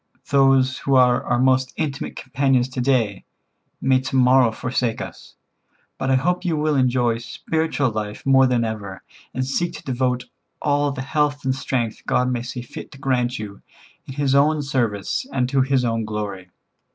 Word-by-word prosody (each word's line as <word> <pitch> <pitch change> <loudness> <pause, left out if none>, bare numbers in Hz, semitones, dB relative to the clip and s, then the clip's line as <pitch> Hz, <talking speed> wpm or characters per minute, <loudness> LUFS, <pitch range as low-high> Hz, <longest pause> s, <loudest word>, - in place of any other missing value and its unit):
Those 135 -1 +4
who 135 - +1
are 125 -1 +4
our 120 - +1
most 130 +1 +2
intimate 145 -4 -3
companions 130 -1 +1
to 130 -1 -3
day 120 -7 +1 0.6
may 130 -1 +3
to 130 +1 -4
morrow 125 -2 +5
forsake 120 0 -2
us. - - -9 0.6
But 135 - -1
I 130 - +4
hope 180 +8 0
you 170 -4 0
will 150 0 +1
enjoy 125 -3 +2
spiritual 145 +3 -1
life 105 -1 -5
more 135 -1 +5
than 120 -2 +1
ever, 100 -4 -6 0.3
and 130 +1 -2
seek 170 +6 -1
to - - -9
devote 125 -1 -1 0.3
all 145 0 +1
the 130 -2 -5
health 145 0 0
and 130 - +2
strength 120 -4 -2
God 125 0 +2
may 120 -1 -1
see 125 0 -6
fit 120 - -10
to - - -12
grant 130 -2 0
you, 100 -2 -8 0.5
in 135 - -8
His 140 -2 +1
own 150 +2 +3
service 120 -8 -1
and 125 -2 0
to 135 0 +2
His 130 -1 +2
own 115 -1 0
glory. 105 -4 -5
130 Hz, 175 wpm, -22 LUFS, 120-135 Hz, 0.6 s, morrow